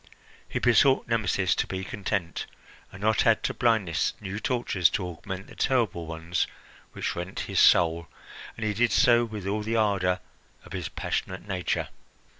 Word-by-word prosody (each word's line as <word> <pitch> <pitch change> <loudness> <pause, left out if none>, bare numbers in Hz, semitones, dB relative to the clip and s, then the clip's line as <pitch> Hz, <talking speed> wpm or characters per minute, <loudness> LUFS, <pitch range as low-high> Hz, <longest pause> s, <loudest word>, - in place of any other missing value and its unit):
He - - -2
besought 130 +3 +4
Nemesis 100 -5 +1
to - - -1
be 95 0 -4
content, 95 -4 -3 0.4
and 95 +2 -10
not 110 +1 +3
add 115 -1 +4
to - - 0
blindness 110 -9 +1
new 100 0 -5
tortures 105 -7 +1
to 95 - -2
augment 95 +3 -7
the - - -14
terrible 110 -10 0
ones 80 +1 -2 0.5
which - - -3
rent 90 +2 -4
his - - -1
soul, 85 -1 +5 0.5
and 110 - -3
he 105 - 0
did 115 +2 +2
so 120 0 +5
with 105 -4 -7
all 105 +2 -1
the 110 +2 -2
ardour 95 -4 +2 0.5
of - - -11
his - - -4
passionate 95 +2 -4
nature. 90 -4 -2
100 Hz, 165 wpm, -27 LUFS, 90-110 Hz, 0.5 s, soul